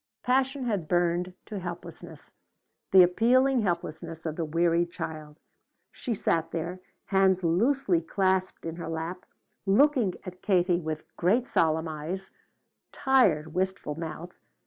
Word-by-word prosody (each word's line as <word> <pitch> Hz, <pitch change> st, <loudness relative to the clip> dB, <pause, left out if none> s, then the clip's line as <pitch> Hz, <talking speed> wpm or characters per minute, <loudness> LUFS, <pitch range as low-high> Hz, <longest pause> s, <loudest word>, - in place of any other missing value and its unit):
Passion 265 Hz, +2 st, +1 dB
had 205 Hz, -9 st, -1 dB
burned 175 Hz, +1 st, +1 dB
to 210 Hz, -3 st, -6 dB
helplessness, 170 Hz, -3 st, -9 dB, 0.6 s
the 190 Hz, -1 st, +9 dB
appealing 250 Hz, +8 st, +3 dB
helplessness 165 Hz, -3 st, -3 dB
of 155 Hz, -2 st, -3 dB
the 170 Hz, -, -2 dB
weary 170 Hz, +2 st, +2 dB
child. 155 Hz, -3 st, -7 dB, 0.5 s
She 240 Hz, -4 st, -4 dB
sat 165 Hz, -4 st, 0 dB
there, 170 Hz, +3 st, -4 dB, 0.3 s
hands 190 Hz, -1 st, +3 dB
loosely 190 Hz, +2 st, +2 dB
clasped 185 Hz, +1 st, 0 dB
in 165 Hz, 0 st, -5 dB
her 170 Hz, -, -5 dB
lap, 165 Hz, +3 st, -5 dB, 0.4 s
looking 235 Hz, -, +3 dB
at 185 Hz, 0 st, -9 dB
Katie 180 Hz, -3 st, +2 dB
with 155 Hz, -1 st, -6 dB
great 220 Hz, +9 st, +2 dB
solemn 160 Hz, -4 st, +1 dB
eyes, 160 Hz, +5 st, -5 dB, 0.6 s
tired 190 Hz, -, +2 dB
wistful 190 Hz, -4 st, -2 dB
mouth. 165 Hz, +2 st, -7 dB
175 Hz, 125 wpm, -28 LUFS, 165-195 Hz, 0.6 s, the